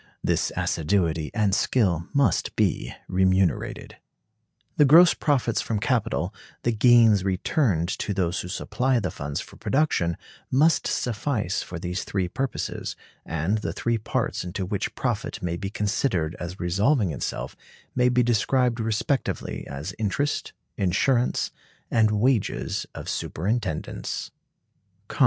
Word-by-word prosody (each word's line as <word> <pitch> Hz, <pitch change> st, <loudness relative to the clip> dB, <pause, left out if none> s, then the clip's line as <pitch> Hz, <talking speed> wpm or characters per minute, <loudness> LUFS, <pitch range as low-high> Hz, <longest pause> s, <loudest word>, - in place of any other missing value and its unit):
This -, -, +1 dB
assiduity 80 Hz, -2 st, 0 dB
and 105 Hz, -3 st, +1 dB
skill 90 Hz, -8 st, +1 dB
must 140 Hz, -, +1 dB
be -, -, 0 dB, 0.2 s
remunerated. 95 Hz, 0 st, +1 dB, 0.8 s
The -, -, +7 dB
gross 160 Hz, +5 st, +8 dB
profits 130 Hz, -6 st, +1 dB
from 110 Hz, -2 st, -2 dB
capital, -, -, 0 dB, 0.3 s
the 120 Hz, -, +2 dB
gains 115 Hz, -3 st, +5 dB
returned 95 Hz, -, +1 dB
to -, -, -2 dB
those 95 Hz, -2 st, 0 dB
who -, -, -7 dB
supply 125 Hz, +7 st, 0 dB
the 95 Hz, -6 st, -2 dB
funds 70 Hz, -1 st, -4 dB
for -, -, -13 dB
production, 130 Hz, -, +1 dB, 0.3 s
must 155 Hz, +5 st, +3 dB
suffice 110 Hz, -5 st, -1 dB
for 90 Hz, -, -7 dB
these 90 Hz, +2 st, -3 dB
three 95 Hz, -3 st, -1 dB
purposes; 135 Hz, +8 st, -3 dB, 0.3 s
and 80 Hz, +7 st, 0 dB
the -, -, -3 dB
three 115 Hz, -1 st, 0 dB
parts 105 Hz, -, -2 dB
into 90 Hz, +2 st, -4 dB
which 100 Hz, +2 st, -3 dB
profit 115 Hz, -5 st, -2 dB
may 85 Hz, -1 st, -1 dB
be 95 Hz, +3 st, -4 dB
considered 100 Hz, -, 0 dB
as 90 Hz, +2 st, -6 dB
resolving 100 Hz, -, +2 dB
itself 70 Hz, -, -4 dB, 0.4 s
may 125 Hz, 0 st, +3 dB
be 125 Hz, 0 st, +3 dB
described 120 Hz, +1 st, +2 dB
respectively 115 Hz, +4 st, -1 dB
as 70 Hz, +7 st, -5 dB
interest, 125 Hz, +7 st, -1 dB, 0.3 s
insurance, 120 Hz, +7 st, +1 dB, 0.4 s
and 110 Hz, -2 st, +4 dB
wages 110 Hz, +2 st, 0 dB
of -, -, -7 dB
superintendence. 95 Hz, -2 st, -3 dB
105 Hz, 125 wpm, -25 LUFS, 90-125 Hz, 0.8 s, gross